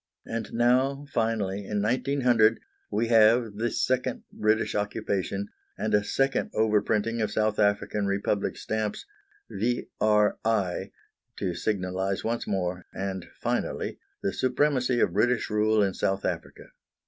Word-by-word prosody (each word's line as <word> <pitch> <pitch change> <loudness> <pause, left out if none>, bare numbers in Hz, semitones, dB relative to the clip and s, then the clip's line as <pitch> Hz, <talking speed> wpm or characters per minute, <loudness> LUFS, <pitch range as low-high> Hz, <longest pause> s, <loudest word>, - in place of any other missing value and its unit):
And 115 0 -4
now, 130 +4 +2
finally, 110 -4 0
in 105 +1 -2
1900 120 -2 +3 0.3
we 110 +3 0
have 115 -1 +5
the 120 +2 0
second 130 0 -1
British 110 +1 +1
Occupation, 100 -1 -2 0.3
and - - -2
a 105 0 +4
second 135 +5 0
overprinting 110 +1 +1
of 110 - 0
South 110 0 0
African 100 0 +1
Republic 100 +1 -1
stamps 110 -1 -3 0.5
"V.R.I.", 105 -4 0 0.5
to 95 -3 -2
signalise 95 0 -2
once 115 +1 -2
more, 90 -2 -2
and 95 -2 -4
finally, - - -2 0.2
the 100 - 0
supremacy 130 -1 +1
of 85 - +2
British 115 +3 +1
rule 105 0 +3
in 95 -1 0
South 95 +1 -1
Africa. - - -5
110 Hz, 125 wpm, -27 LUFS, 100-115 Hz, 0.5 s, have